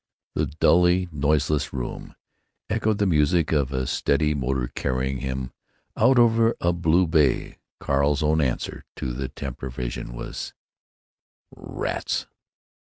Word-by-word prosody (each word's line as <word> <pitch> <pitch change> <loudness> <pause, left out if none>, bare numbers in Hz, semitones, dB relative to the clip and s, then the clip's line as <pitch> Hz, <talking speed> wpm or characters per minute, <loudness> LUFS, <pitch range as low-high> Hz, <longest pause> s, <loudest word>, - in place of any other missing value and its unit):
The - - 0
dully 90 +4 +3
noiseless 75 0 +1
room 60 -2 -5 0.6
echoed 110 -1 +1
the 100 - +1
music 80 -1 +2
of 70 -4 +1
a 65 -1 -1
steady 75 +4 +1
motor 65 -2 -1
carrying 65 +1 -1
him 65 0 -4 0.4
out 130 -1 +4
over 115 -1 +4
a 85 +1 +1
blue 85 +1 +3
bay. 80 -5 +1 0.2
Carl's 70 +1 +1
own 80 +1 +3
answer 65 -4 -2
to 65 - -4
the 65 +1 -3
tempter 65 -1 -6
vision - - -5
was: - - -6 1.0
"Rats! - - -3
75 Hz, 125 wpm, -24 LUFS, 65-85 Hz, 1.0 s, out